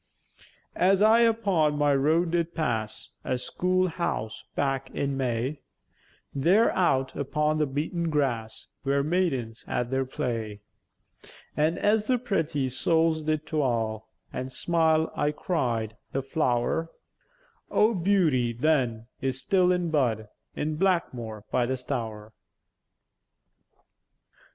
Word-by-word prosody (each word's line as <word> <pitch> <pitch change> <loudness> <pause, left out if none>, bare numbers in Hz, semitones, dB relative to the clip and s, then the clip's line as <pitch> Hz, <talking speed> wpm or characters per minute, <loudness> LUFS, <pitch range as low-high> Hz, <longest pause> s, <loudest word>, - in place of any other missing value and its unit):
As 195 +2 +4
I 220 +2 +6
upon 200 -10 +2
my 145 -1 +3
road 160 +5 +2
did 170 0 -1
pass 110 -9 -1
A 130 - -1
school 185 +7 0
house 165 -10 -3
back 135 -1 -1
in 140 -1 -1
May, 130 +2 -1 0.7
There 180 +11 +4
out 135 -8 +1
upon 150 +2 0
the 150 - +2
beäten 160 +5 -2
grass 125 -7 -1 0.2
Wer 140 0 +1
maïdens 140 -9 -1
at 125 0 -2
their 135 0 +1
play; 115 -5 -4 0.9
An' 155 +3 +1
as 210 0 +2
the 255 - +3
pretty 165 - -1
souls 160 +4 +1
did 155 0 -1
tweil 115 -7 -1 0.3
An' 130 +1 -4
smile, 160 +3 +1
I 145 - +1
cried, 120 - -2 0.2
"The 135 - -1
flow'r 135 +3 0 0.8
O' 220 +2 +3
beauty, 165 - +2
then, 120 -4 +1 0.2
is 130 -1 -1
still 185 0 +3
in 175 -2 0
bud 115 -8 0 0.3
In 150 +1 -2
Blackmwore 125 - -1
by 125 -1 +2
the 130 +1 -1
Stour." 110 -5 -5
145 Hz, 120 wpm, -27 LUFS, 125-170 Hz, 0.9 s, I